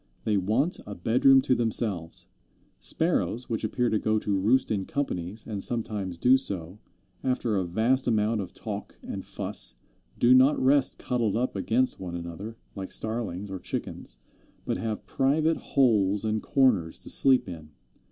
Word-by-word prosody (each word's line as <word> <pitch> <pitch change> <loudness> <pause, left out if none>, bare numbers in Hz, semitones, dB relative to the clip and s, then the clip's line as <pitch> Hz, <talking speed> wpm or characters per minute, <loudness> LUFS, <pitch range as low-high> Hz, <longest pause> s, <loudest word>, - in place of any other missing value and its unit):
They 110 - +1
want 110 - +1
a 100 - -6
bedroom 130 +8 +4
to 130 - +2
themselves. 110 -8 -1 0.5
Sparrows, 115 - 0
which 115 - -2
appear 120 +3 0
to 110 - +2
go 110 +1 +1
to 105 -1 -1
roost 110 +8 +2
in 100 -3 -1
companies, 105 -7 -3
and 105 -3 -4
sometimes 105 -7 -2
do 125 +8 +5
so, 95 -4 -5 0.4
after 125 -4 0
a 95 -2 0
vast 115 +9 +1
amount 110 -1 +1
of 90 -2 -7
talk 105 -2 -7
and - - -6
fuss, - - -2 0.4
do 120 +1 +5
not 130 +3 +5
rest 135 0 +3
cuddled 115 -4 -1
up 125 -1 -1
against 115 +6 +1
one 90 -2 -6
another, 85 +6 -7 0.2
like 95 -2 -6
Starlings 105 -4 -2
or 95 - -5
Chickens, - - -6 0.5
but - - -1
have 110 -2 -4
private 155 +4 +1
holes 105 -6 +2
and 110 0 0
corners 110 -12 +2
to - - -4
sleep 130 -5 +4
in. 80 -4 -9
110 Hz, 160 wpm, -27 LUFS, 95-125 Hz, 0.5 s, do